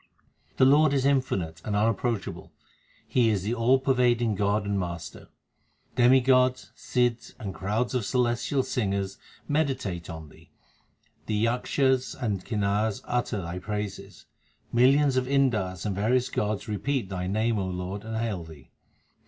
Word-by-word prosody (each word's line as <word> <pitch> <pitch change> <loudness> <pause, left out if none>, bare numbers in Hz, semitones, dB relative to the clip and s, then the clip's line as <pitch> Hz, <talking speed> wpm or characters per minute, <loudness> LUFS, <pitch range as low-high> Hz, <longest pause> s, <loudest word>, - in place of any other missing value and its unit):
The 130 - +5
Lord 145 +2 +5
is 135 -1 +1
infinite 95 - 0
and 105 - -2
unapproachable, 115 +1 -1 0.6
He 120 -3 +3
is 100 -4 0
the 110 +4 -1
all 120 +3 +3
pervading 125 -4 +2
God 100 +1 0
and 100 -1 0
Master. 85 -4 -6 0.7
Demigods, 130 0 +4
Sidhs, 120 -2 -1
the 105 -6 -5
crowd 105 +8 -2
of 125 -3 0
celestial 125 +3 0
singers 100 -5 -2 0.3
meditate 130 - -1
on 80 -2 -8
Thee; - - -19 0.8
the 110 - -1
Yakshas 125 +4 +1
and 105 -7 -2
Kinars 105 0 -1
utter 120 -5 -1
Thy 85 +2 -5
praises. 100 0 -6 0.5
Millions 135 +3 +4
of 130 0 +1
Indars 110 -10 +1
and 105 - -1
various 120 +5 +1
gods 105 +1 -2
repeat 110 +1 -2
Thy 90 -1 -3
name, 110 +3 0
O 95 - -2
Lord, 90 +2 -5
and 110 0 -4
hail 110 -6 -2
Thee. 80 -4 -14
110 Hz, 140 wpm, -27 LUFS, 100-125 Hz, 0.8 s, The